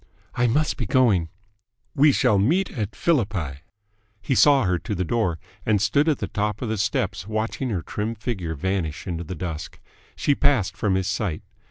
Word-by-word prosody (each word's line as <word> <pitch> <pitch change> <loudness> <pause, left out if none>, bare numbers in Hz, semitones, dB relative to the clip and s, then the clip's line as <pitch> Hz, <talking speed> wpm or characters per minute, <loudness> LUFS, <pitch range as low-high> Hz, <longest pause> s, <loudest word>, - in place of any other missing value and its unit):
"I 120 0 +2
must 150 +6 +1
be 120 - -3
going." 100 -9 +3 0.6
"We 145 +2 +5
shall 105 -6 +3
meet 170 - +2
at 110 -3 -4
Philippi." 100 - 0 0.6
He 105 - -1
saw 140 0 +5
her 90 -3 +1
to 105 +2 -4
the 90 - -1
door, 95 -4 0 0.3
and 105 -2 +2
stood 140 - +2
at 150 - +2
the - - -3
top 105 +2 -2
of 120 - -2
the 110 -2 -2
steps 95 - -1
watching 110 +4 -2
her 95 -8 -2
trim 105 +8 -3
figure 95 -7 -4
vanish 85 -1 -2
into 85 -3 -3
the 90 +3 -6
dusk. 85 -1 -6 0.4
She 145 - +2
passed 135 -9 +2
from 100 -4 0
his 95 -1 0
sight. 95 -4 -2
105 Hz, 185 wpm, -24 LUFS, 90-125 Hz, 0.6 s, We